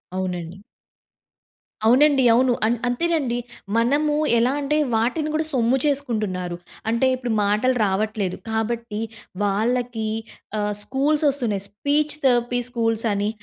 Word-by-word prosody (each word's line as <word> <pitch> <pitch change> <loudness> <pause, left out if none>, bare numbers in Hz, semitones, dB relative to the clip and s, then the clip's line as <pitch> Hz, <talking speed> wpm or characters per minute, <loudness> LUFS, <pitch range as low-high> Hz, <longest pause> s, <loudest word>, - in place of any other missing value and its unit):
అవునండి. 180 -2 -4 1.3
అవునండి 270 +3 +5
అవును. 250 +1 +4
అన్ 235 +2 +1
అంతేనండి, 270 -2 0 0.4
మనము 290 +6 +2 0.2
ఎలా 240 +3 +3
అంటే 300 +2 0 0.2
వాటిని 250 +8 0
కూడా 315 +1 0
సొమ్ము 245 0 +2
చేసుకుంటున్నారు. 215 -11 -1 0.3
అంటే 235 +3 +2
ఇప్పుడు 245 -2 -4
మాటలు 215 +6 +2
రావట్లేదు, 200 -1 -1
కాబట్టి 225 0 -2 0.4
వాళ్ళకి 225 +2 0 0.5
ఆహ్, 210 0 -1
స్కూల్స్ 290 +5 0
వస్తున్నాయి. 235 -8 -1
స్పీచ్ 290 +8 0
థెరపీ 245 -1 +3
స్కూల్స్ 225 -2 -1
అని 205 +1 0
235 Hz, 110 wpm, -22 LUFS, 215-265 Hz, 1.3 s, అవునండి